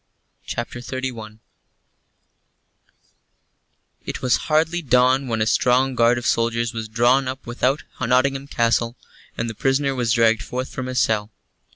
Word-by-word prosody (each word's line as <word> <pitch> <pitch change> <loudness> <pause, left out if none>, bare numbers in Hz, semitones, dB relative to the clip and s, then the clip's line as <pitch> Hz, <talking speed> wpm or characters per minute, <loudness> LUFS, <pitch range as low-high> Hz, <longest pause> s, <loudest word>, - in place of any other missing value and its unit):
CHAPTER 120 +1 -4
XXXI 120 -4 -6 2.7
It - - -6
was 125 -5 +3
hardly 160 +3 +2
dawn 130 -1 +3
when 110 -2 0
a - - -1
strong 125 +3 +2
guard 120 0 +3
of 120 - -5
soldiers 115 +1 0
was 110 -1 -5
drawn 120 +4 +3
up 130 +2 -6
without 130 +4 0 0.2
Nottingham 135 +3 +1
Castle, 115 -2 0 0.4
and 115 - -2
the 115 - -4
prisoner 135 +4 0
was 120 -3 0
dragged 115 -2 +3
forth 130 +1 -4
from 130 -1 -5
his 130 0 -1
cell. 105 -1 +1
125 Hz, 140 wpm, -22 LUFS, 115-130 Hz, 2.7 s, was